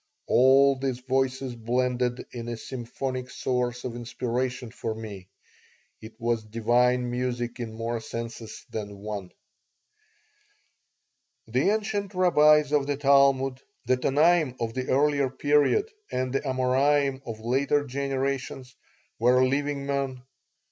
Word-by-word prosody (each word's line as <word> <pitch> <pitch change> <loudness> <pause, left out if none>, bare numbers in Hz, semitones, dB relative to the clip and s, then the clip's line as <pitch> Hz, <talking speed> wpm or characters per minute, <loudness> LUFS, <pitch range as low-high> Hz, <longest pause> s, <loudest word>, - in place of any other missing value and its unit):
All 135 +2 +5
these 130 -2 -1
voices 130 0 -1
blended 125 +1 -1
in 120 -1 -6
a 120 -1 -4
symphonic 130 +2 -5
source 125 -1 -2
of 120 -2 -5
inspiration 125 0 -3
for 115 -2 -4
me. 105 -4 -8 0.7
It 110 0 -11
was 115 -1 0
divine 120 +3 +1
music 120 -1 -3
in 115 -2 -4
more 115 +1 -3
senses 115 -1 -7
than 100 -2 -5
one 100 -2 -6 2.1
The 125 - +1
ancient 205 -2 -1
rabbis 150 -5 +5
of 145 -2 +2
the 145 -1 -1
Talmud, 135 -2 +3 0.2
the 130 - +3
Tanaim 150 +2 +3
of 115 -1 -2
the 130 +1 -3
earlier 140 0 +2
period 145 - +2 0.2
and 130 0 -2
the 135 - +1
Amorairn 135 +1 +1
of 115 -4 -7
later 135 +5 +1
generations, 135 -1 -3 0.4
were 125 +3 +4
living 140 +1 -1
men. 135 -2 -2
130 Hz, 120 wpm, -26 LUFS, 120-140 Hz, 2.1 s, All